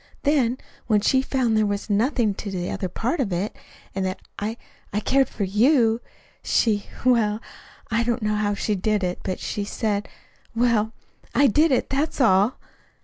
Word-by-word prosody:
Then, 265 -5 +2 0.3
when 210 -3 +3
she 260 +5 +3
found 255 -4 0
there 215 - +3
was 205 0 -2
nothing 220 +1 +1
to 200 - -6
the 180 -2 -3
other 185 - -3
part 240 - -2
of 230 -8 0
it, 180 +4 -2 0.4
and 195 - -2
that 185 0 -2 0.2
I 220 +3 -3 0.3
I 210 - 0
cared 270 +4 +2
for 210 - -3
you, 225 +3 +3 0.4
she 210 -3 +1 0.2
well, 220 -4 +3 0.5
I 230 +1 +2
don't 235 0 -1
know 210 0 +1
how 210 -1 0
she 210 - -1
did 205 +1 0
it, 180 0 -2
but 185 - -3
she 205 - -3
said 205 0 -2 0.5
well, 230 -2 +2 0.4
I 285 - +5
did 300 +6 +4
it. 255 - +1
That's 285 +4 -1
all." 210 -1 +4
220 Hz, 175 wpm, -24 LUFS, 205-250 Hz, 0.5 s, I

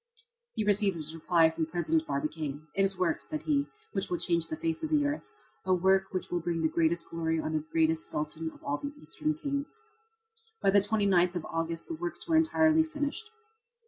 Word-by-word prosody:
He 215 - 0
received 205 -2 +3
his 155 -1 -5
reply 165 0 +3
from 160 -1 -2
President 160 -1 0
Barbicane: 150 +1 -3
"It 195 - +1
is 195 -1 +2
a - - -16
work," 170 -3 +1
said 310 -1 -5
he, 285 -2 +1 0.2
"which - - -2
will 355 - 0
change 170 - 0
the 155 - -3
face 160 0 -2
of 315 - -2
the 300 -2 +3
earth 290 +8 -3 0.3
a 185 0 +3
work 190 +2 +3
which 185 - -4
will 175 - +1
bring 170 -1 -2
the - - +5
greatest 165 +1 +1
glory 165 -1 0
on 155 0 -2
the 155 -1 0
greatest 160 0 +2
Sultan 155 +2 -3
of - - -17
all 145 +1 -1
the 285 +1 -6
Eastern 310 0 -2
kings." 285 +5 -3 0.8
By 195 - +3
the 200 - +6
29th 195 -4 +3
of 175 - -3
August 165 0 -2
the - - -4
works 345 +1 -5
were 330 - +2
entirely 320 0 +4
finished. 305 +7 -3
175 Hz, 210 wpm, -30 LUFS, -, 0.8 s, the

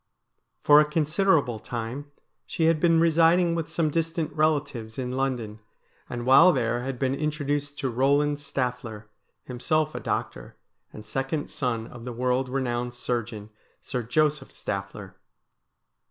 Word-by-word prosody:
For 145 0 +8
a - - +3
considerable 155 - +2
time 120 +6 -5 0.4
she 165 - -2
had 160 -1 +3
been 165 0 +4
residing 165 +1 +4
with 165 -2 -3
some 160 -1 0
distant 165 -1 -1
relatives 145 -8 -1
in 125 -1 -3
London, 125 -5 -2 0.5
and 120 -1 -5
while 135 +8 +7
there 120 -3 0
had 130 0 -4
been 130 +1 0
introduced 145 -1 -2
to 130 -4 -2
Eoland 145 +3 +2
Stamer, 125 -6 -4 0.4
himself 155 +5 -1
a - - -4
doctor, - - -4 0.4
and 105 - -11
second 135 +5 -3
son 115 -4 -2
of 120 0 -11
the 125 0 -5
world 125 +2 0
renowned 125 -2 -2
surgeon, 115 -3 -4 0.3
Sir 125 -3 -3
Joseph 150 +4 0
Stafner. 100 -1 -6
135 Hz, 140 wpm, -26 LUFS, 120-155 Hz, 0.5 s, For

